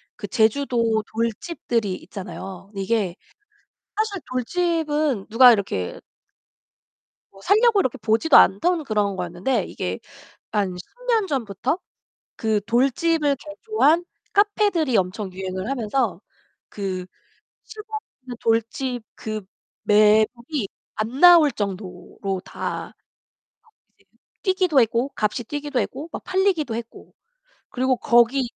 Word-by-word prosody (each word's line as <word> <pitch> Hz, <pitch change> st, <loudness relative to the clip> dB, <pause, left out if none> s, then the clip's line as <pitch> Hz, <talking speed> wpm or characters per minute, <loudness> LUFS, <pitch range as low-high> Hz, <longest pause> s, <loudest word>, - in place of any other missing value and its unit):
그 -, -, -7 dB
제주도 230 Hz, -1 st, +1 dB
돌집들이 230 Hz, -, -2 dB
있잖아요. 195 Hz, 0 st, -8 dB
근데 200 Hz, -2 st, -5 dB
이게 195 Hz, -3 st, 0 dB, 0.8 s
사실 425 Hz, -4 st, -1 dB
돌집은 300 Hz, -, 0 dB
누가 245 Hz, +3 st, +8 dB
이렇게 195 Hz, -, -1 dB, 1.3 s
뭐 195 Hz, -, -17 dB
살려고 430 Hz, -, +4 dB
이렇게 260 Hz, -10 st, 0 dB
보지도 230 Hz, +8 st, +4 dB
않던 320 Hz, -, +4 dB
그런 210 Hz, -5 st, 0 dB
거였는데 180 Hz, +5 st, -1 dB
이게 90 Hz, +1 st, -4 dB, 0.5 s
한 200 Hz, -4 st, 0 dB
10 180 Hz, -, -8 dB, 0.2 s
년 450 Hz, -5 st, +2 dB
전부터 255 Hz, -, -2 dB, 0.6 s
그 220 Hz, -2 st, 0 dB
돌집을 280 Hz, +5 st, +2 dB
개조한 320 Hz, -, +1 dB, 0.3 s
카페들이 405 Hz, -, +2 dB
엄청 190 Hz, +1 st, -2 dB
유행을 190 Hz, +2 st, -4 dB
하면서 240 Hz, -5 st, -1 dB, 0.5 s
그 190 Hz, -3 st, -4 dB, 0.6 s
시골에 435 Hz, 0 st, -7 dB, 0.2 s
있는 250 Hz, -1 st, -8 dB
돌집 230 Hz, +2 st, -1 dB
그 215 Hz, -1 st, -5 dB, 0.4 s
매물이 215 Hz, +4 st, +3 dB, 0.3 s
안 230 Hz, +6 st, -3 dB
나올 345 Hz, -4 st, +8 dB
정도로 190 Hz, -1 st, -5 dB
다 -, -, -5 dB, 1.0 s
값이 -, -, -29 dB, 0.4 s
뛰기도 370 Hz, -6 st, +2 dB
했고 235 Hz, +3 st, +1 dB
값이 215 Hz, +3 st, -1 dB
뛰기도 290 Hz, +2 st, -2 dB
했고 285 Hz, +5 st, -4 dB
막 -, -, -6 dB
팔리기도 375 Hz, -, +1 dB
했고. 230 Hz, 0 st, -8 dB, 0.6 s
그리고 260 Hz, 0 st, +1 dB
거기 240 Hz, +3 st, +3 dB
235 Hz, 240 characters per minute, -23 LUFS, 205-305 Hz, 1.3 s, 누가